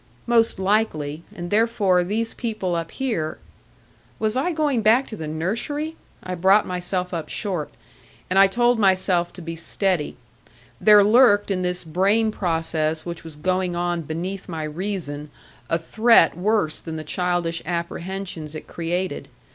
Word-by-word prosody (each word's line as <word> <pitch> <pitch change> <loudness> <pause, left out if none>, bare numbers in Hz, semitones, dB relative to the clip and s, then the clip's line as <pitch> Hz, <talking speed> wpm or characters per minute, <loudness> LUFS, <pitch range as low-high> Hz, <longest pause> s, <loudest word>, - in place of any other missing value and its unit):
Most 230 -1 +3
likely; 185 -7 0
and 175 0 -6
therefore 205 -4 +3
these 225 +5 -1
people 215 -6 -3
up 165 -1 -3
here 215 -13 -2 0.8
Was 215 +1 0
I 275 +8 +1
going 295 -7 +1
back 225 +5 +4
to 220 - -8
the 160 -6 -6
nursery? 235 - -3 0.3
I 185 - -4
brought 190 +4 +4
myself 180 0 -2
up 160 -3 -4
short. 180 -8 -2 0.6
And 190 +1 +2
I 195 - +8
told 240 +3 +2
myself 185 -3 +2
to 180 - -9
be 165 0 -5
steady; 175 0 -1 0.6
there 210 -1 +7
lurked 210 -2 +5
in 185 -1 0
this 180 0 -2
brain 195 +7 +2
process 160 -4 -1
which 170 -1 -6
was 160 -2 -9
going 185 +3 -1
on 175 0 -1
beneath 180 +6 -5
my 160 -2 -4
reason 155 -3 -4 0.4
a 165 - +2
threat 220 +2 +4
worse 185 -3 +1
than 160 -1 -6
the 155 - -5
childish 175 +1 -1
apprehensions 170 -1 -4
it 155 - -7
created. 175 +2 -3
185 Hz, 150 wpm, -23 LUFS, 165-215 Hz, 0.8 s, I